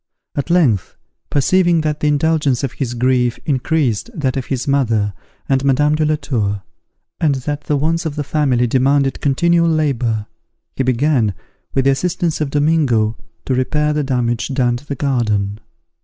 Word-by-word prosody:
At 140 - -3
length, 145 - +2 0.3
perceiving 175 +3 +3
that 150 -1 -2
the 150 - 0
indulgence 150 -3 +1
of 135 - -1
his 125 -3 -4
grief 125 -1 +1
increased 145 - 0
that 135 -6 -1
of 130 -2 -3
his 130 -1 -3
mother 115 -7 +1 0.3
and 135 -1 +1
Madame 145 +2 +3
de 155 0 +1
la 155 0 +2
Tour, 105 -9 -2 0.6
and 150 -4 +2
that 145 +3 -4
the 150 - +1
wants 165 +4 0
of 145 - -5
the 150 - -2
family 135 -4 +1
demanded 135 +3 +1
continual 170 +4 +2
labour, 125 -9 0 0.5
he - - -1
began, 130 -4 +1 0.4
with 135 - +2
the 135 - +5
assistance 165 +2 -1
of 150 - 0
Domingo, 140 -7 +2 0.3
to 130 - 0
repair 150 +4 +1
the 150 0 0
damage 125 -3 -1
done 120 -2 +2
to 145 - -15
the 140 - -3
garden. 110 -7 -1
140 Hz, 165 wpm, -18 LUFS, 125-150 Hz, 0.6 s, the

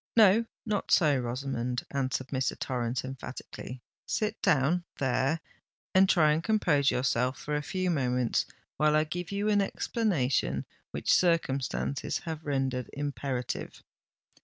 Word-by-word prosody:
"No—not 215 0 +3
so, 150 -5 +5
Rosamond," 125 0 -2
answered 130 -1 -1
Mr. 130 -1 -1
Torrens 125 -1 -2
emphatically. 130 -1 -8 0.2
"Sit 215 0 -1
down—there—and 160 +2 0
try 155 -5 +5
and 155 +2 +1
compose 170 -10 +3
yourself 125 0 +1
for 150 - -3
a 150 - 0
few 185 +4 -1
moments, 125 -5 +1 0.3
while 150 0 +3
I 155 - +4
give 175 +3 -5
you 200 +1 -1
an 205 -1 +4
explanation 195 - 0 0.2
which - - +1
circumstances 140 -5 +1
have 160 -1 -5
rendered 135 -3 -1
imperative." 140 -3 -4
145 Hz, 115 wpm, -29 LUFS, 130-175 Hz, 0.3 s, so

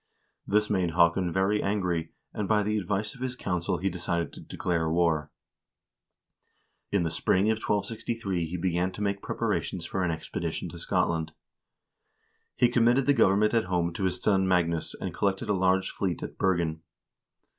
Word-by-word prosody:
1 100 - -1
This 105 0 +4
made 95 -5 +1
Haakon 85 +1 +3
very 95 +4 +1
angry, 90 -5 -1 0.2
and 105 - -2
by 105 0 +3
the 105 +1 0
advice 100 +2 -2
of 125 - -14
his 130 -1 -2
council 90 -7 -1
he 95 - -1
decided 85 -2 -2
to - - -10
declare 85 -3 -1
war. 80 -3 +1 1.6
In 100 -3 +2
the 80 - -1
spring 95 +5 +2
of 110 - 0
1263 105 -4 -2
he 90 +3 -4
began 90 +1 0
to - - -7
make 100 -1 -1
preparations - - -2
for 95 - -2
an 90 - +1
expedition 80 -1 -4
to - - -9
Scotland. 80 -2 0 1.2
He 120 - +4
committed 120 +2 +3
the 145 - +5
government 105 -3 +4
at 115 -3 +2
home 85 -2 0
to 95 +2 -2
his 90 -1 -1
son 95 -1 +2
Magnus, 85 -3 +1
and - - -4
collected 100 +2 -1
a - - +3
large 95 0 +2
fleet 90 -4 -2
at - - -6
Bergen. 85 -4 +1
95 Hz, 170 wpm, -28 LUFS, 85-105 Hz, 1.6 s, the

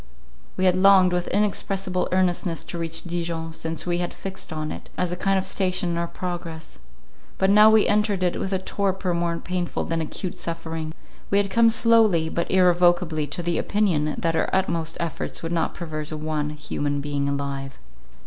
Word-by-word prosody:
We 185 - +1
had 180 -1 +4
longed 185 -1 +6
with 180 0 -1
inexpressible 195 -2 0
earnestness 180 -2 +1
to 170 - -6
reach 165 0 -2
Dijon, 170 -2 -3
since 160 0 -4
we 175 -1 0
had 175 -1 -3
fixed 190 -1 -6
on 155 -1 -3
it, - - -8
as 180 -1 0
a - - -1
kind 195 +2 +1
of 190 - -1
station 185 -2 0
in 170 - -1
our 170 - -1
progress. 170 -3 -6 0.6
But 190 +1 +3
now 210 +1 +8
we 220 -1 +5
entered 205 -2 +1
it 180 - 0
with 190 - -3
a 190 - +2
torpor 190 -1 -1
more 170 0 0
painful 180 0 -3
than 165 0 -2
acute 175 +3 -4
suffering. 165 -1 -5 0.3
We 200 - +2
had 200 -1 +1
come 230 +3 +5
slowly 225 -8 +4
but 170 - -2
irrevocably 175 -4 +3
to 175 - -3
the 170 0 0
opinion, 170 -8 +1
that 165 -1 0
our 160 - +1
utmost 170 -4 0
efforts 170 -1 -4
would 165 - -3
not 165 -2 -1
preserve 155 -2 -5
one 155 -1 -1
human 145 -1 -3
being 140 0 -1
alive. 140 -1 -4
175 Hz, 185 wpm, -24 LUFS, 160-190 Hz, 0.6 s, now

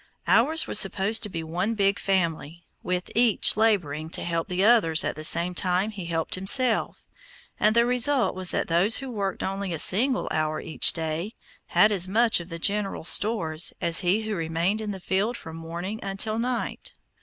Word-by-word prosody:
Ours 310 +7 +3
was - - +3
supposed 200 +3 +2
to 210 - -3
be 165 -3 -5
one 180 +8 -2
big 200 -1 +1
family, 170 -3 -2 0.2
with 180 0 -3
each 235 -2 +3
laboring 170 -9 0
to - - -3
help 165 -1 -2
the 185 0 -1
others 205 -8 +4
at - - -3
the 155 - -8
same 170 +3 +2
time 185 +4 -1
he 190 -5 -8
helped 165 -1 -2
himself, 230 +5 +2 0.5
and 215 +1 +2
the 235 0 +4
result 250 +1 +1
was 185 -1 -3
that - - -2
those 175 +6 +3
who 270 -2 -5
worked 200 -4 -4
only 195 -1 -3
a - - -3
single 250 - +2
hour 155 0 -1
each 160 - +1
day, 165 +6 -4 0.3
had 210 - +3
as 185 -3 +1
much 225 +3 +2
of 170 +1 -10
the 165 - -6
general 200 +2 -2
stores 170 -4 0
as 170 -1 0
he 195 +4 0
who 215 0 -4
remained 170 +5 -2
in 215 - -5
the 195 -2 -5
field 200 +6 -1
from 160 0 -10
morning 170 +6 -6
until 200 +3 -2
night. 245 0 -4
195 Hz, 190 wpm, -25 LUFS, 170-220 Hz, 0.5 s, others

